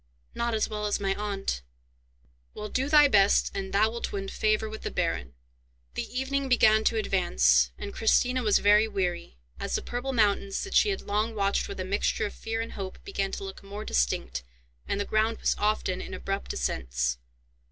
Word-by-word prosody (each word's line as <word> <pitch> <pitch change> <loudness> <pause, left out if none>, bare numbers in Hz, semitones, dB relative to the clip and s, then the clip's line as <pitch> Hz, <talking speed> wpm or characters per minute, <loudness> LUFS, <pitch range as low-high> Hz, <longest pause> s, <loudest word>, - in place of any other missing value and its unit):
"Not 235 -1 -1
as 215 - +1
well 210 -1 -3
as 205 - 0
my 195 -1 0
aunt." 195 - -3 0.9
"Well, 210 0 -5
do 265 +5 -1
thy 295 -1 +7
best, 200 -5 +4
and 190 -1 -4
thou 215 +2 +3
wilt 235 0 -4
win 195 -1 -4
favour 215 0 +1
with 220 0 -7
the - - -3
baron." 65 +1 -2 0.6
The - - -4
evening 275 0 -1
began 220 -3 +5
to 225 - +2
advance, 65 - +3
and 200 - -6
Christina 250 +3 +2
was 215 -4 +4
very 210 +2 +5
weary, 180 - -3 0.2
as - - -2
the - - -2
purple 245 +2 -3
mountains 205 -4 +1
that 390 - -6
she 425 - +5
had 390 - -2
long 215 +2 -1
watched 200 -1 +1
with - - -7
a 185 - -2
mixture 200 +2 0
of 205 - -5
fear 225 0 -3
and 230 - -5
hope 190 -2 -6
began 195 - -2
to - - -4
look 195 0 -7
more 200 +2 -7
distinct, - - 0 0.5
and 200 - -1
the 205 - -1
ground 220 +2 +1
was - - +2
often 210 -3 0
in - - -6
abrupt 195 +1 -3
ascents. - - -1
205 Hz, 195 wpm, -28 LUFS, 195-225 Hz, 0.9 s, thy